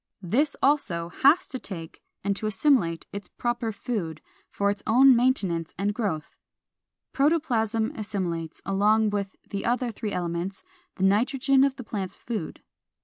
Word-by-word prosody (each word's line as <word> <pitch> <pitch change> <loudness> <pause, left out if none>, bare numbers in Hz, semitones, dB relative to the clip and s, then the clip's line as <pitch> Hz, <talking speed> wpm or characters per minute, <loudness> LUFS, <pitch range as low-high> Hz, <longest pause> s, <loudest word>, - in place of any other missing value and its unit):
This 270 - +1
also 180 - +1
has 280 - +4
to 260 - -4
take 165 -8 -8 0.2
and 200 0 0
to 215 - -3
assimilate 205 - +2
its 200 -2 -6
proper 240 -1 -2
food, 200 - -4 0.3
for 200 0 +1
its 205 0 -5
own 255 +3 +7
maintenance 195 -10 +1
and 200 +3 0
growth. 195 -9 -3 0.7
Protoplasm 240 -7 +1
assimilates, 180 -7 -3
along 210 +2 +3
with 200 -2 -3 0.2
the 200 - -3
other 245 0 0
three 215 -1 -5
elements, 175 +1 -3 0.3
the 190 - -3
nitrogen 265 +7 +3
of 275 -1 +2
the 255 - -8
plant's 200 -4 -4
food. 220 -9 -5
210 Hz, 145 wpm, -26 LUFS, 190-250 Hz, 0.7 s, own